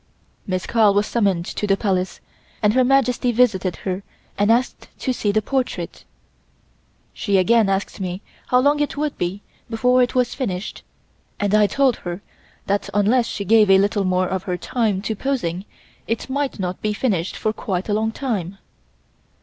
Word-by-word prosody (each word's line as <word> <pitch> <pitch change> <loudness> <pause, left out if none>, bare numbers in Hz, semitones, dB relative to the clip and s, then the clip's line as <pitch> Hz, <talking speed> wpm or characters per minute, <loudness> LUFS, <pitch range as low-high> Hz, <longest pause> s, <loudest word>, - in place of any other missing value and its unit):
Miss 185 -2 -2
Carl 215 -4 +3
was 205 +1 +3
summoned 195 -7 +1
to 210 - -3
the 195 -1 +3
Palace, 190 -3 -1 0.4
and 210 0 +4
Her 255 +1 +4
Majesty 250 -2 +2
visited 210 -7 +2
her 185 0 -2 0.3
and 205 +2 +3
asked 245 +3 0
to 260 - -1
see 210 -4 0
the 215 +1 +1
portrait. 265 -2 -3 1.1
She 200 -2 0
again 215 +2 +4
asked 195 +1 -2
me 185 +1 -4 0.2
how 250 0 +4
long 290 +2 +3
it 295 0 -1
would 295 -1 -1
be 180 +4 -3 0.3
before 250 +2 +3
it 245 0 +1
was 250 -1 +2
finished, 205 -6 -4 0.6
and 205 0 0
I 210 -1 +5
told 270 +1 +2
her 175 +2 -6 0.4
that 200 +1 -1
unless 230 +4 +3
she 200 - -4
gave 215 0 +5
a 195 - +7
little 200 +1 +1
more 185 0 +1
of 190 0 -2
her 180 -2 -2
time 210 0 -1
to 220 - -2
posing 200 -8 -2 0.4
it 230 +3 -3
might 280 0 -1
not 180 -2 -4
be 210 0 0
finished 200 -6 -1
for 215 - -1
quite 190 -4 -3
a 210 - 0
long 220 +1 +1
time. 200 -8 -3
210 Hz, 175 wpm, -21 LUFS, 190-245 Hz, 1.1 s, a